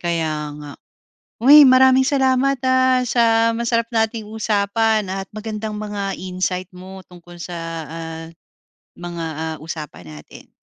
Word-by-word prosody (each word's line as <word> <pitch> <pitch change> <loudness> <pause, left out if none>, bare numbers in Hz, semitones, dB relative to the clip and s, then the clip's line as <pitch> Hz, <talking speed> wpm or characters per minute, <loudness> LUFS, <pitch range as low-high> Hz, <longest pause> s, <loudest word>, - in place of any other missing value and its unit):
kaya 165 -2 -1 0.3
nga. 145 -1 -9 0.7
Uy, 290 +5 +9
maraming 260 0 +5
salamat 265 -1 +1
ah, 260 0 +3
sa 230 -1 +2
masarap 230 0 -1
nating 225 -2 -1
usapan 215 -1 0
at 195 +1 -4
magandang 215 0 -5
mga 205 -2 -4
insight 185 0 -3
mo 190 0 -11
tungkol 175 -1 -15
sa 175 0 -6 0.3
ah, 165 0 -7 0.7
mga 175 -1 -6
ah 160 0 -4
usapan 155 - -8
natin. 75 -1 -13
210 Hz, 125 wpm, -20 LUFS, 175-230 Hz, 0.7 s, Uy